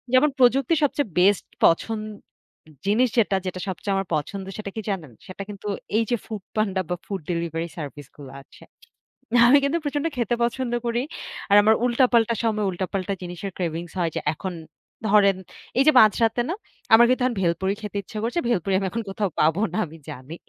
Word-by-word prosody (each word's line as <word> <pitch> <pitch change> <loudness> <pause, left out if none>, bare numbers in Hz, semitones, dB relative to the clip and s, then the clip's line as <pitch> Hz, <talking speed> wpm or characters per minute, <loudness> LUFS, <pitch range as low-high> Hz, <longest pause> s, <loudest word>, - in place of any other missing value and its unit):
যেমন 295 +4 +5
প্রযুক্তির 270 +5 +4
সবচেয়ে 285 -5 0
বেস্ট 195 +1 +4 0.2
পছন 215 +6 +2 0.9
জিনিস 230 +5 +3
যেটা 205 -3 +3
যেটা 185 0 -4
সবচেয়ে 195 +2 -3
আমার 195 -1 -1
পছন্দ, 190 +6 -4
সেটা 210 -2 -5
কি 220 - -3
জানেন? 170 -9 -4 0.2
সেটা 190 +1 -7
কিন্তু 205 0 -8 0.3
এইযে 230 +1 +1
Foodpanda 205 -2 -2
বা, 180 - 0
ফুড 195 -2 -4
ডেলিভারি 170 0 -2
সার্ভিসগুলো 145 -2 -9
আছে। - - -18 0.8
আমি 280 +4 +7
কিন্তু 285 +4 +1
প্রচন্ড 290 +1 -2
খেতে 240 0 +1
পছন্দ 240 0 -1
করি। 235 +1 0 0.5
আর - - +7
আমার 220 +1 +5
উল্টাপাল্টা 235 -2 +3
সময় 215 -2 0
উল্টাপাল্টা 185 +2 -3
জিনিসের 180 +2 -6
cravings 170 -1 -3
হয় 170 -2 0
যে - - -1
এখন 185 +3 -5 0.6
ধরেন 200 -2 +5 0.4
এইযে 305 +3 +6
মাঝরাতে 225 +2 +4
না, 355 - -1 0.4
আমার 235 +2 +9
কিন্তু 255 0 +2
এখন 255 - +1
ভেলপুরি 185 +2 +1
খেতে 210 -1 -5
ইচ্ছা 215 - -9
করছে। 240 +9 0
ভেলপুরি 195 -3 0
আমি 195 - -1
এখন 230 0 -3
কোথাও 200 0 -1
পাবো 160 +5 +3
না - - -2
আমি 160 - -12
জানি। 130 +6 -8
200 Hz, 170 wpm, -24 LUFS, 180-235 Hz, 0.9 s, আমার